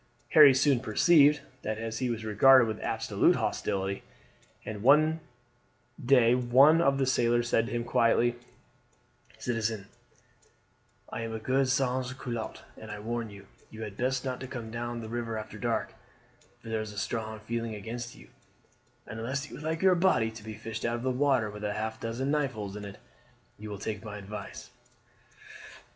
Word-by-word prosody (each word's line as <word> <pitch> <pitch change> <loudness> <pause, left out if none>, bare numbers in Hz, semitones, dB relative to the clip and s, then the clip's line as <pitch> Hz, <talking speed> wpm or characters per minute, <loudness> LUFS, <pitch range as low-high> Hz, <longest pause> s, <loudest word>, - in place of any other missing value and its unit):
Harry 150 -3 +9
soon 135 0 +3
perceived 145 +5 +4 0.2
that 110 0 -3 0.2
he 125 0 -1
was 115 -2 -3
regarded 120 +4 +6
with 110 - -4
absolute - - +1
hostility, 95 0 -2 0.6
and 105 -2 -6
one 155 +6 +5 0.8
day 125 -2 +5
one 130 +6 +5
of 140 -4 +3
the 135 - +1
sailors 120 -2 +2
said 115 -1 +2
to - - -7
him 120 0 -1
quietly: 120 0 +2 1.0
"Citizen, 115 -4 -2 1.2
I - - -5
am 115 0 -4
a - - -4
good 130 +3 +1
sans 130 -1 0
culotte, 120 -3 -6
and - - -11
I 105 - -6
warn 115 +1 -3
you, 100 -1 -12 0.2
you 110 0 -8
had 105 -2 -7
best 130 +3 -1
not 130 -1 -3
come 115 -3 -6
down 120 0 -4
the 110 - -7
river 115 -1 -3
after 110 0 -8
dark, 115 -1 -1 0.7
for 115 - -9
there 110 -1 -1
is 110 -1 -6
a - - -12
strong 110 +1 -3
feeling 115 0 -4
against 120 +3 -6
you; - - -16 0.8
and 110 - -8
unless 135 +5 -3
you - - -8
would 150 - -9
like 160 +2 -2
your 190 -1 +6
body 170 -11 +2
to 110 -1 -11
be 110 0 -7
fished 110 0 -6
out 115 0 0
of 120 - -5
the 130 - +1
river 130 -5 +1
with 105 0 -9
half 110 +1 -3
a - - -25
dozen 120 +5 -2
knife 145 -3 0
holes 105 -3 -6
in 105 -1 -7
it, 100 0 -9 0.6
you 105 0 -7
will 100 - -5
take 105 +1 -5
my 105 -1 -7
advice." 105 +4 -8
120 Hz, 180 wpm, -29 LUFS, 110-130 Hz, 1.2 s, Harry